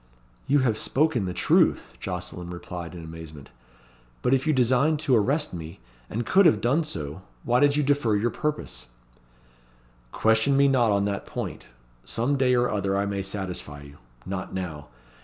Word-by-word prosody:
"You 145 Hz, +1 st, +4 dB
have 115 Hz, -4 st, +1 dB
spoken 140 Hz, -6 st, +1 dB
the 90 Hz, -, -2 dB
truth," -, -, +2 dB
Jocelyn 90 Hz, -1 st, -5 dB
replied 90 Hz, 0 st, -7 dB
in 85 Hz, -, -8 dB
amazement; 80 Hz, -4 st, -10 dB, 0.7 s
"but 125 Hz, -, +3 dB
if 135 Hz, +3 st, +1 dB
you -, -, +4 dB
designed 130 Hz, +3 st, +3 dB
to 135 Hz, -5 st, +3 dB
arrest 140 Hz, +7 st, +1 dB
me, 80 Hz, -3 st, -8 dB, 0.3 s
and 115 Hz, +2 st, -3 dB
could 190 Hz, -1 st, +5 dB
have 160 Hz, -, +4 dB
done 140 Hz, +8 st, +2 dB
so, 75 Hz, -, -5 dB, 0.2 s
why 120 Hz, +1 st, +2 dB
did 145 Hz, +1 st, +4 dB
you 150 Hz, -, +2 dB
defer 140 Hz, -6 st, +2 dB
your 115 Hz, +3 st, +1 dB
purpose?" 150 Hz, -, -3 dB, 1.2 s
"Question 110 Hz, +5 st, +3 dB
me 140 Hz, 0 st, +5 dB
not 125 Hz, -5 st, +3 dB
on 100 Hz, 0 st, +2 dB
that 100 Hz, -1 st, -3 dB
point. -, -, -6 dB, 0.4 s
Some 125 Hz, +5 st, 0 dB
day 130 Hz, -2 st, +3 dB
or 120 Hz, 0 st, +3 dB
other 100 Hz, -1 st, 0 dB
I 100 Hz, -, +1 dB
may 100 Hz, -1 st, -2 dB
satisfy 90 Hz, -7 st, -5 dB
you. 70 Hz, 0 st, -14 dB, 0.3 s
Not 95 Hz, -1 st, -5 dB
now. 80 Hz, -6 st, -5 dB
110 Hz, 170 wpm, -26 LUFS, 90-135 Hz, 1.2 s, could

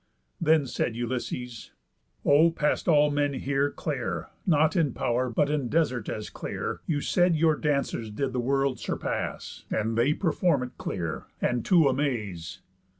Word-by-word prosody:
Then 160 Hz, -3 st, +4 dB
said 120 Hz, -2 st, -2 dB
Ulysses: 120 Hz, 0 st, -4 dB, 0.5 s
"O, 150 Hz, +4 st, +6 dB
past 150 Hz, -2 st, -1 dB
all 150 Hz, -3 st, +5 dB
men 145 Hz, 0 st, +1 dB
here 140 Hz, +1 st, 0 dB
Clear, 120 Hz, -, -4 dB, 0.2 s
not 155 Hz, -2 st, +3 dB
in 155 Hz, -8 st, +2 dB
pow'r, 125 Hz, +2 st, 0 dB
but 140 Hz, +5 st, +1 dB
in 145 Hz, -5 st, -1 dB
desert 130 Hz, -8 st, 0 dB
as 105 Hz, -, -5 dB
clear, -, -, -4 dB
You 145 Hz, -4 st, 0 dB
said 175 Hz, +1 st, +3 dB
your 160 Hz, 0 st, +3 dB
dancers 140 Hz, -7 st, -1 dB
did 130 Hz, +5 st, -2 dB
the 125 Hz, -, -1 dB
world 135 Hz, +1 st, +1 dB
surpass, -, -, -4 dB
And 110 Hz, +1 st, -1 dB
they 125 Hz, +6 st, +3 dB
perform 165 Hz, -5 st, +1 dB
it 125 Hz, -, -6 dB
clear, 85 Hz, -4 st, -4 dB
and 120 Hz, -2 st, 0 dB
to 170 Hz, -6 st, +5 dB
amaze." 105 Hz, -, -2 dB
140 Hz, 150 wpm, -27 LUFS, 120-150 Hz, 0.5 s, O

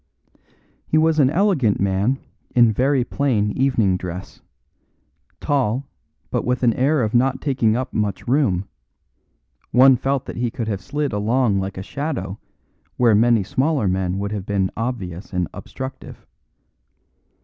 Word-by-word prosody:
He 155 Hz, -, +2 dB
was 160 Hz, 0 st, +3 dB
an 135 Hz, -3 st, +5 dB
elegant 160 Hz, -, +2 dB
man 100 Hz, +7 st, +1 dB, 0.4 s
in 120 Hz, -2 st, +6 dB
very 130 Hz, +4 st, +2 dB
plain 120 Hz, -6 st, 0 dB
evening 115 Hz, -7 st, +1 dB
dress; 90 Hz, +1 st, -7 dB, 1.0 s
tall, 135 Hz, -2 st, 0 dB, 0.5 s
but -, -, 0 dB
with 125 Hz, +1 st, -1 dB
an 120 Hz, -2 st, +4 dB
air 135 Hz, +2 st, +2 dB
of 110 Hz, -, -2 dB
not 130 Hz, +2 st, +2 dB
taking 125 Hz, -6 st, +1 dB
up 130 Hz, +1 st, -3 dB
much 105 Hz, 0 st, -2 dB
room; 115 Hz, -9 st, +1 dB, 1.0 s
one 130 Hz, +2 st, +6 dB
felt 135 Hz, +2 st, -1 dB
that -, -, -7 dB
he 120 Hz, 0 st, 0 dB
could 115 Hz, -1 st, -5 dB
have 100 Hz, -3 st, -2 dB
slid 145 Hz, +7 st, -3 dB
along 105 Hz, 0 st, +1 dB
like 95 Hz, 0 st, -4 dB
a 95 Hz, -, -4 dB
shadow 110 Hz, -, -4 dB, 0.6 s
where 120 Hz, -3 st, +4 dB
many 115 Hz, 0 st, +4 dB
smaller 130 Hz, +3 st, 0 dB
men 95 Hz, 0 st, -1 dB
would 100 Hz, +1 st, -3 dB
have 100 Hz, -3 st, -5 dB
been 95 Hz, -2 st, 0 dB
obvious 105 Hz, -7 st, -5 dB
and 90 Hz, -2 st, 0 dB
obstructive. 130 Hz, 0 st, -8 dB
120 Hz, 145 wpm, -21 LUFS, 100-135 Hz, 1.0 s, in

